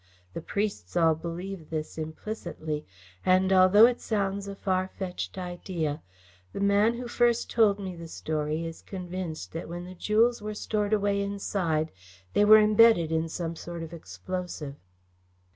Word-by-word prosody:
The -, -, -5 dB
priests 200 Hz, +1 st, -3 dB
all 165 Hz, -1 st, +5 dB
believe 170 Hz, +2 st, -6 dB
this 155 Hz, -1 st, -4 dB
implicitly, 160 Hz, -2 st, -5 dB, 0.4 s
and, 185 Hz, +1 st, +4 dB
although 190 Hz, +4 st, +8 dB
it 245 Hz, 0 st, +1 dB
sounds 200 Hz, -2 st, -1 dB
a 200 Hz, -, -6 dB
far 185 Hz, -1 st, 0 dB
fetched 190 Hz, 0 st, -5 dB
idea, 175 Hz, -4 st, -3 dB, 0.5 s
the -, -, -4 dB
man 200 Hz, +3 st, +3 dB
who 245 Hz, +1 st, -5 dB
first 240 Hz, -1 st, +1 dB
told 215 Hz, -4 st, +4 dB
me 190 Hz, -2 st, -5 dB
the 165 Hz, -1 st, -8 dB
story 155 Hz, 0 st, -2 dB
is 165 Hz, 0 st, -7 dB
convinced 180 Hz, -3 st, -6 dB
that 165 Hz, +1 st, -6 dB
when 175 Hz, +1 st, -6 dB
the 185 Hz, -, -9 dB
jewels 220 Hz, +5 st, +2 dB
were 210 Hz, 0 st, -5 dB
stored 210 Hz, -1 st, -1 dB
away 200 Hz, -1 st, +2 dB
inside, 190 Hz, -6 st, -1 dB, 0.4 s
they 205 Hz, -, +4 dB
were 215 Hz, +1 st, +9 dB
imbedded 215 Hz, -5 st, +5 dB
in 160 Hz, 0 st, 0 dB
some 165 Hz, 0 st, -4 dB
sort 170 Hz, 0 st, -7 dB
of 165 Hz, -, -8 dB
explosive." 155 Hz, -, -6 dB
185 Hz, 155 wpm, -28 LUFS, 165-205 Hz, 0.5 s, were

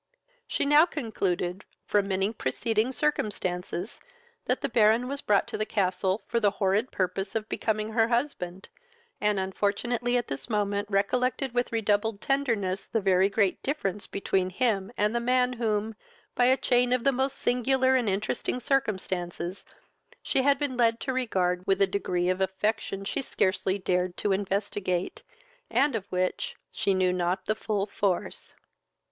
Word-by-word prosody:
She -, -, -1 dB
now 295 Hz, +4 st, +6 dB
concluded, 190 Hz, -, -2 dB, 0.2 s
from 205 Hz, -1 st, +1 dB
many 195 Hz, +2 st, 0 dB
preceding 220 Hz, -, 0 dB
circumstances, 205 Hz, -, -2 dB, 0.5 s
that -, -, 0 dB
the -, -, 0 dB
Baron 230 Hz, 0 st, +3 dB
was 280 Hz, +2 st, -4 dB
brought 205 Hz, -1 st, +2 dB
to -, -, -4 dB
the -, -, +2 dB
castle 190 Hz, 0 st, 0 dB
for 235 Hz, -, 0 dB
the 210 Hz, -3 st, +4 dB
horrid 205 Hz, +4 st, +1 dB
purpose 190 Hz, +2 st, -2 dB
of 220 Hz, -1 st, -1 dB
becoming 215 Hz, -1 st, -1 dB
her 225 Hz, 0 st, +3 dB
husband, 235 Hz, -7 st, -2 dB, 0.5 s
and 210 Hz, -1 st, +2 dB
unfortunately 220 Hz, +6 st, 0 dB
at 240 Hz, -, -2 dB
this 135 Hz, -, -6 dB
moment 205 Hz, -1 st, 0 dB
recollected 250 Hz, +6 st, 0 dB
with 245 Hz, 0 st, 0 dB
redoubled 215 Hz, -1 st, +1 dB
tenderness 225 Hz, -10 st, 0 dB
the 225 Hz, -, 0 dB
very 190 Hz, -1 st, +3 dB
great 200 Hz, -2 st, +1 dB
difference 210 Hz, -9 st, -2 dB
between 190 Hz, -2 st, 0 dB
him 200 Hz, -1 st, 0 dB
and 210 Hz, +1 st, +2 dB
the 235 Hz, -, +1 dB
man 250 Hz, +1 st, +2 dB
whom, 220 Hz, -2 st, -1 dB, 0.4 s
by 245 Hz, -, +3 dB
a 260 Hz, +1 st, +5 dB
chain 245 Hz, -1 st, +2 dB
of 250 Hz, -2 st, +1 dB
the 275 Hz, -, +4 dB
most 265 Hz, +1 st, -1 dB
singular 260 Hz, +2 st, +2 dB
and 245 Hz, -5 st, +2 dB
interesting 210 Hz, +5 st, -1 dB
circumstances, 190 Hz, -8 st, -2 dB, 0.6 s
she 265 Hz, -, +1 dB
had 280 Hz, +1 st, +4 dB
been 280 Hz, -3 st, -2 dB
led 230 Hz, -1 st, +3 dB
to 265 Hz, -, -2 dB
regard 185 Hz, -8 st, 0 dB
with 195 Hz, 0 st, +3 dB
a 200 Hz, -, +6 dB
degree 185 Hz, -2 st, -1 dB
of 185 Hz, +1 st, 0 dB
affection 195 Hz, +1 st, -1 dB
she 275 Hz, -, -2 dB
scarcely 190 Hz, -5 st, 0 dB
dared 180 Hz, -1 st, -1 dB
to 205 Hz, -, 0 dB
investigate, 195 Hz, -2 st, -1 dB, 0.5 s
and 280 Hz, -2 st, +2 dB
of 200 Hz, -2 st, -5 dB
which 185 Hz, 0 st, -1 dB, 0.2 s
she 195 Hz, -, 0 dB
knew 185 Hz, -1 st, +2 dB
not 180 Hz, +1 st, -1 dB
the 215 Hz, -, +1 dB
full 210 Hz, -2 st, -2 dB
force. 200 Hz, -3 st, -2 dB
210 Hz, 160 wpm, -27 LUFS, 190-245 Hz, 0.6 s, now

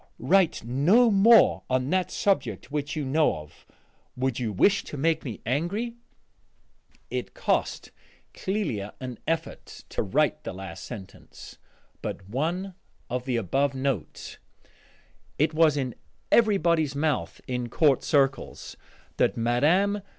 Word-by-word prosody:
Write 175 Hz, +4 st, +2 dB
no 175 Hz, -, +4 dB
more 210 Hz, +1 st, +6 dB
on 130 Hz, +1 st, 0 dB
that 185 Hz, -1 st, +1 dB
subject 140 Hz, -, -1 dB
which 145 Hz, -1 st, -3 dB
you 150 Hz, -2 st, -2 dB
know 150 Hz, +4 st, +2 dB
of: 75 Hz, -1 st, -13 dB, 0.5 s
would 130 Hz, -1 st, -1 dB
you 115 Hz, -3 st, -2 dB
wish 195 Hz, -, +3 dB
to 150 Hz, -, -8 dB
make 160 Hz, +3 st, +1 dB
me 120 Hz, -7 st, -6 dB
angry?" 175 Hz, -, -1 dB, 1.2 s
It -, -, -4 dB
cost -, -, -1 dB, 0.4 s
Clélia 155 Hz, -, -3 dB
an 125 Hz, -2 st, -7 dB
effort 165 Hz, 0 st, -4 dB
to -, -, -2 dB
write 150 Hz, +8 st, +1 dB
the -, -, -5 dB
last 95 Hz, -2 st, -8 dB
sentence 100 Hz, -6 st, -11 dB, 0.4 s
but 95 Hz, -, -6 dB
one 170 Hz, -, -2 dB, 0.4 s
of 125 Hz, 0 st, -2 dB
the 125 Hz, -3 st, 0 dB
above 135 Hz, +7 st, 0 dB
note. 130 Hz, -, -3 dB, 1.0 s
It 155 Hz, +3 st, +2 dB
was 155 Hz, -2 st, +4 dB
in 130 Hz, -3 st, -2 dB, 0.4 s
everybody's 170 Hz, -10 st, +3 dB
mouth 145 Hz, -1 st, -1 dB
in 125 Hz, -1 st, -3 dB
court 140 Hz, +1 st, +3 dB
circles 135 Hz, -2 st, 0 dB, 0.4 s
that -, -, +2 dB
Mme. 155 Hz, -, +2 dB
145 Hz, 130 wpm, -26 LUFS, 125-170 Hz, 1.2 s, more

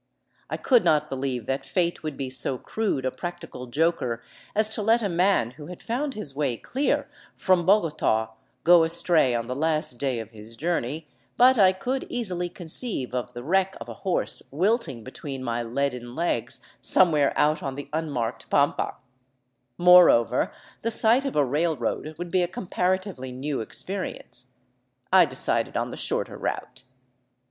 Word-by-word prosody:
I -, -, -3 dB
could 245 Hz, -4 st, +3 dB
not 150 Hz, -1 st, +2 dB
believe 130 Hz, -3 st, -3 dB
that 135 Hz, +3 st, -2 dB
fate 175 Hz, -2 st, -1 dB
would 155 Hz, -3 st, -5 dB
be 135 Hz, -2 st, -4 dB
so 130 Hz, 0 st, +3 dB
crude 200 Hz, -, -2 dB
a 130 Hz, -, 0 dB
practical 175 Hz, -7 st, -7 dB
joker 125 Hz, -4 st, 0 dB, 0.3 s
as 215 Hz, +1 st, +4 dB
to 220 Hz, -, +1 dB
let 225 Hz, +2 st, +3 dB
a -, -, +1 dB
man 175 Hz, -, +2 dB
who 145 Hz, +3 st, -11 dB
had 180 Hz, -, -10 dB
found 265 Hz, +4 st, -2 dB
his 155 Hz, -11 st, -4 dB
way 135 Hz, -5 st, -1 dB
clear 275 Hz, -, -1 dB, 0.3 s
from 185 Hz, -2 st, +2 dB
Bogota 150 Hz, -, +2 dB, 0.3 s
go 175 Hz, -1 st, +7 dB
astray 160 Hz, -5 st, +3 dB
on 115 Hz, -1 st, -2 dB
the 125 Hz, -, -4 dB
last 155 Hz, -3 st, 0 dB
day 135 Hz, -3 st, 0 dB
of 110 Hz, 0 st, -8 dB
his 110 Hz, +1 st, -11 dB
journey, 155 Hz, 0 st, -2 dB, 0.3 s
but 255 Hz, 0 st, +6 dB
I 190 Hz, -2 st, +7 dB
could 250 Hz, +8 st, -3 dB
easily 180 Hz, -7 st, -2 dB
conceive 175 Hz, -, -3 dB
of 125 Hz, -1 st, -3 dB
the 120 Hz, 0 st, -7 dB
wreck 190 Hz, +5 st, +1 dB
of -, -, -8 dB
a -, -, -5 dB
horse 190 Hz, -, -1 dB
wilting 170 Hz, -, 0 dB
between 135 Hz, +1 st, -7 dB
my 120 Hz, -1 st, -2 dB
leaden 125 Hz, 0 st, -3 dB
legs 125 Hz, -9 st, -2 dB, 0.2 s
somewhere 155 Hz, -6 st, +4 dB
out 150 Hz, +1 st, +2 dB
on 135 Hz, -1 st, -4 dB
the 145 Hz, 0 st, -7 dB
unmarked 125 Hz, -8 st, -3 dB
pampa; 140 Hz, 0 st, +1 dB, 0.8 s
moreover, 180 Hz, -9 st, +6 dB, 0.3 s
the 230 Hz, -, -1 dB
sight 230 Hz, +4 st, +4 dB
of 275 Hz, -, -3 dB
a 145 Hz, -, +3 dB
railroad 150 Hz, +1 st, -1 dB
would 175 Hz, 0 st, -6 dB
be 185 Hz, -, +3 dB
a 175 Hz, -, +1 dB
comparatively 185 Hz, -5 st, -2 dB
new 135 Hz, +1 st, -3 dB
experience. 190 Hz, -, -6 dB, 0.7 s
I -, -, +8 dB
decided -, -, -1 dB
on -, -, -2 dB
the -, -, -6 dB
shorter -, -, -3 dB
route. -, -, -4 dB
155 Hz, 165 wpm, -25 LUFS, 130-185 Hz, 0.8 s, I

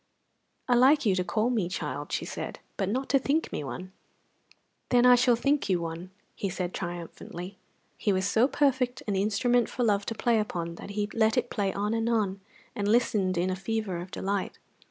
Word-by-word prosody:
"I 250 Hz, -, +3 dB
like 265 Hz, +4 st, +5 dB
you 200 Hz, -, +4 dB
to 185 Hz, -1 st, 0 dB
call 215 Hz, +7 st, 0 dB
me 210 Hz, -8 st, 0 dB
child," 145 Hz, -5 st, -4 dB
she -, -, -1 dB
said, -, -, -5 dB, 0.2 s
"but 195 Hz, -2 st, -1 dB
not 260 Hz, +5 st, -1 dB
to 275 Hz, -, +4 dB
think 290 Hz, +4 st, 0 dB
me -, -, -3 dB
one." 185 Hz, +7 st, -6 dB, 1.0 s
"Then 245 Hz, 0 st, +4 dB
I 250 Hz, -, +9 dB
shall 245 Hz, 0 st, +5 dB
think 280 Hz, +1 st, +1 dB
you 180 Hz, -2 st, +2 dB
one," 170 Hz, +2 st, -5 dB, 0.4 s
said 180 Hz, -1 st, -3 dB
he, -, -, -25 dB
triumphantly. 175 Hz, +1 st, -6 dB, 0.4 s
He 205 Hz, -, +1 dB
was 190 Hz, 0 st, +1 dB
so 225 Hz, +5 st, +4 dB
perfect 260 Hz, -4 st, +1 dB
an 205 Hz, -, -1 dB
instrument 220 Hz, +4 st, +2 dB
for 250 Hz, -, -2 dB
love 205 Hz, -3 st, +1 dB
to 225 Hz, -, -2 dB
play 235 Hz, 0 st, +2 dB
upon 170 Hz, -5 st, -3 dB
that -, -, -9 dB
he 205 Hz, 0 st, +1 dB
let 220 Hz, +1 st, +2 dB
it 245 Hz, -1 st, 0 dB
play 200 Hz, -3 st, 0 dB
on 205 Hz, +3 st, -1 dB
and 225 Hz, 0 st, 0 dB
on, 200 Hz, -4 st, 0 dB, 0.3 s
and 205 Hz, -1 st, -1 dB
listened 210 Hz, -5 st, +2 dB
in 180 Hz, +2 st, +1 dB
a -, -, -1 dB
fever 205 Hz, -1 st, -2 dB
of 175 Hz, +2 st, -6 dB
delight. 195 Hz, +1 st, -3 dB
205 Hz, 200 wpm, -28 LUFS, 185-240 Hz, 1.0 s, I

